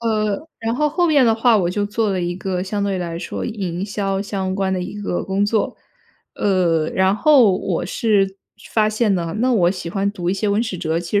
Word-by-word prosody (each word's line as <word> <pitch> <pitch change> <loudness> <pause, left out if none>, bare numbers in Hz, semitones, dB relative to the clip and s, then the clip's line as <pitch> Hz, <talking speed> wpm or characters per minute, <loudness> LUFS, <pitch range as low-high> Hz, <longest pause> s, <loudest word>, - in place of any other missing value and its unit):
呃， 220 +5 -1
然 225 +1 -2
后 300 +3 +1
后 345 +4 +1
面 290 -5 +4
的 225 -1 +4
话， 230 0 +4
我 175 -3 +1
就 205 +2 -1
做 210 +1 0
了 190 -2 -1
一 175 0 -2
个 185 -1 -3
相 200 +1 -2
对 200 -2 -1
来 170 -2 -4
说 - - -5
营 190 -5 -3
销 195 -2 -2
相 195 -2 -3
关 190 -1 0
的 185 -1 -1
一 205 +3 -6
个 195 -3 -2
工 195 +1 0
作。 210 -1 0 0.6
呃， 170 -5 +1
然 190 +1 +2
后 260 -4 +5
我 180 -3 -2
是 195 -2 +1 0.4
发 215 -1 +3
现 215 -1 +1
呢， 170 0 -2
那 250 +3 +2
我 180 -7 +3
喜 180 -2 -5
欢 195 +3 -1
读 175 -4 -4
一 190 - +1
些 210 +2 -1
文 205 +2 +2
史 220 -5 -4
哲， 160 -1 -1
其 175 +4 0
200 Hz, 240 characters per minute, -20 LUFS, 185-215 Hz, 0.6 s, 后